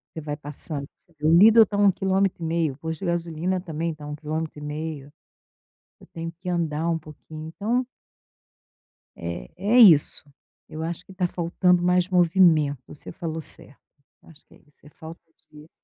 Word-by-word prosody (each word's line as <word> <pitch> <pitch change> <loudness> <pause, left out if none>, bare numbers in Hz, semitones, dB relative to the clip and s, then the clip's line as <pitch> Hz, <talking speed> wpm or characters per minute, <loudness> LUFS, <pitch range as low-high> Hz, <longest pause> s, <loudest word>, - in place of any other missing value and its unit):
Você 160 - -5
vai 145 0 -5
passando 145 0 -5
você 170 - -25
vê 150 - -5
o - - +4
Lidl 220 +5 +7
tá 205 - -5
a - - 0
1 200 -1 +5
quilômetro 190 -1 -1
e - - -3
meio, 160 -3 0
o - - -17
posto 160 +1 -6
de 195 - -6
gasolina 170 +1 -2
também 165 -1 -4
tá 150 -1 -14
a - - -8
1 150 - -5
quilômetro 155 0 -5
e - - -12
meio. 150 -1 -6 0.9
Eu - - -18
tenho 165 0 -5
que 180 0 -6
andar 165 -2 -1
um 165 -1 0
pouquinho, 155 +1 -11
então 225 +9 -2 1.3
eh, 85 -8 -7
é 215 +5 +1
isso. 170 -11 +6 0.5
Eu 155 +1 -6
acho 170 +2 -5
que 190 - -14
tá 180 -1 -1
faltando 175 +1 +1
mais 180 +1 +2
movimento; 165 -6 +3
você 145 - -7
falou 165 -2 -5
certo. 140 - +4 0.4
Acho 160 -2 -19
que - - -21
é - - -23
isso. 145 - -27
É - - -14
falta 160 +2 -12 0.3
de 150 +1 -15
165 Hz, 195 wpm, -24 LUFS, 150-180 Hz, 1.3 s, Lidl